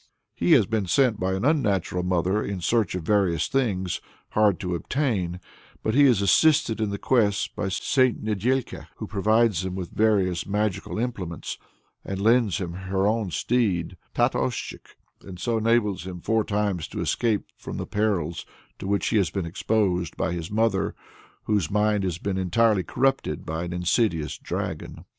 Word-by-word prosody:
He - - +3
has - - +6
been 110 -4 -1
sent 125 +1 +3
by 95 +1 0
an 95 +5 -2
unnatural 105 - +1
mother 90 +3 +1
in 100 -2 -4
search 105 +1 +1
of 90 - -4
various 90 -3 +2
things 95 -9 -1 0.3
hard 105 -4 +3
to 90 - -3
be 90 - 0
obtained, 95 - -1 0.4
but 110 - 0
he 145 +3 +6
is 120 -7 +4
assisted 140 - +3
in 110 - 0
the 100 - -3
quest 105 -6 +1
by 100 - -2
St. 130 +6 +1
Nedĕlka, 115 +5 -1
who - - -6
provides 110 -2 +2
him 95 -1 -4
with 90 -2 -5
various 95 -5 +1
magical 105 0 -1
implements, 100 -8 -4 0.4
and 95 -1 -4
lends 115 -1 +3
him 85 -3 -4
her 95 +1 -1
own 110 -1 +1
steed 95 -2 0 0.2
Tatoschik, - - -1 0.2
and 90 -2 -10
so 115 +3 0
enables 110 -5 +1
him 90 -1 -6
four 110 +4 +1
times 100 -6 -1
to - - -7
escape 110 -4 0
from - - -7
the - - -3
perils 100 -6 -1 0.4
to - - -5
which 100 0 +1
he 110 - +2
has 95 -6 +2
been 95 +1 -3
exposed 90 -1 0
by - - 0
his 85 -1 -4
mother, 105 -2 +1 0.5
whose 100 -7 0
mind 105 0 +2
has 90 -3 -1
been 95 +1 -2
entirely 100 +3 +3
corrupted 130 - 0
by 80 +2 -3
an 85 - -5
insidious 90 -2 0
dragon. - - -5
100 Hz, 170 wpm, -25 LUFS, 90-110 Hz, 0.5 s, has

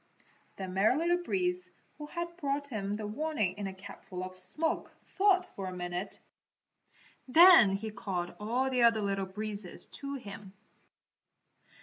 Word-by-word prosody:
The 190 - -5
Merry 195 +8 +2
Little 345 +2 +1
Breeze 360 0 -1 0.3
who 295 - -6
had 340 +2 -5
brought 285 -2 -2
him 205 -4 -3
the 215 0 -5
warning 215 - -1
in 200 - -3
a 190 - -6
capful 190 -1 -8
of 185 0 -7
smoke 300 - 0
thought 380 -2 +3
for 195 -1 -5
a 185 - -6
minute. 175 +2 -4 1.1
Then 315 - +8
he 215 +2 -5
called 185 -4 -4
all 245 +5 0
the 250 -1 +1
other 230 -2 +4
Little 195 -1 -1
Breezes 205 -1 -6 0.2
to 280 0 -4
him. 200 -5 -9
215 Hz, 145 wpm, -31 LUFS, 195-300 Hz, 1.1 s, Then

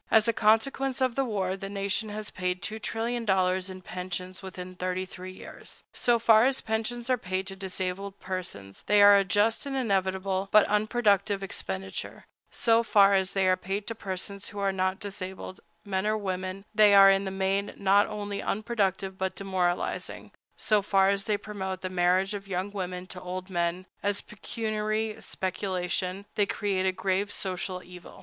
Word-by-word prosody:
As 220 0 +5
a 230 - +3
consequence 250 +5 +2
of 260 -2 +2
the 270 - +1
war, 195 -6 -1
the 195 0 -6
nation 200 +2 -1
has 210 0 -4
paid 180 0 -2
$2,000,000,000 215 -4 0
in 185 0 -9
pensions 180 +1 -5
within 185 -1 -8
thirty 185 +1 -2
three 185 0 -9
years. 185 - -10
So 240 -1 +3
far 230 +1 +6
as 265 0 0
pensions 225 +2 -2
are 250 - +2
paid 185 -1 -2
to 195 0 -5
disabled 190 +1 -4
persons, 175 - -5
they 205 0 +6
are 205 0 +9
a 200 - +5
just 205 +8 +1
and 275 - -3
inevitable, 190 -4 0
but 215 -1 +7
unproductive 210 -2 +2
expenditure; 95 - -5 0.2
so 230 0 +3
far 200 -3 +5
as 190 0 +2
they 195 -1 +2
are 185 - +5
paid 195 +2 -4
to 230 - -3
persons 200 -1 -4
who 205 - -11
are 200 -1 +1
not 185 0 -1
disabled,—men 190 0 -5
or 215 0 +2
women,—they 195 +2 +2
are 195 0 +9
in 195 0 +2
the - - -2
main 195 +1 0
not 200 +1 +4
only 205 -1 -4
unproductive 195 -3 -1
but 190 -1 -1
demoralizing; 185 -3 -2 0.3
so 210 -1 +3
far 195 -1 +3
as 195 0 0
they 210 -1 +1
promote 190 -3 -5
the 185 - -4
marriage 185 +2 +2
of 200 -1 -6
young 190 +1 -2
women 185 -2 -4
to 185 0 -8
old 185 +1 -6
men, 175 +1 -1 0.2
as 205 0 0
a - - -10
pecuniary 215 0 -2
speculation, 185 0 -2
they 205 -1 +2
create 195 -2 0
a - - +3
grave 190 +2 -1
social 185 -1 -3
evil. 180 0 -12
195 Hz, 170 wpm, -28 LUFS, 185-210 Hz, 0.3 s, are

